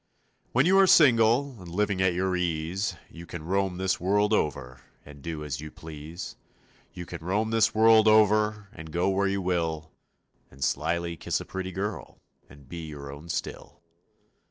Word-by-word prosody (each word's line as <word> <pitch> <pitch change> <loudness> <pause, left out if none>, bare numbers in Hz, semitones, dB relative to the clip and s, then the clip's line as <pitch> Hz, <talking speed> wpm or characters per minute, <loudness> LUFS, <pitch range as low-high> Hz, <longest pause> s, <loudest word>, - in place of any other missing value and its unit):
When 130 +4 +3
you 190 +2 +5
are 195 - +6
single 125 - +4
And 90 - -11
living 100 +2 -1
at 90 -2 +2
your 95 0 0
ease 90 +2 -2 0.2
You 85 0 -11
can 85 -3 -7
roam 95 0 0
this 95 0 0
world 105 +3 +2
over 65 -8 -2 0.2
And 70 -1 -13
do 80 0 -5
as 75 -1 -4
you 75 - -7
please; 80 +2 -9 0.5
You 90 - -8
can 85 -1 -8
roam 105 +5 -1
this 115 -1 +2
world 110 0 +6
over 105 -1 +3
And 80 -7 -10
go 85 +4 +1
where 100 +1 +1
you 100 0 -1
will 80 -3 -2 0.6
And 65 +1 -8
slyly 85 +5 -1
kiss - - -2
a - - -8
pretty 95 0 -5
girl 100 +3 -5 0.3
And 70 -2 -16
be 85 +4 -7
your 70 -2 -8
own 75 +4 -11
still. - - -5
90 Hz, 175 wpm, -27 LUFS, 80-105 Hz, 0.6 s, are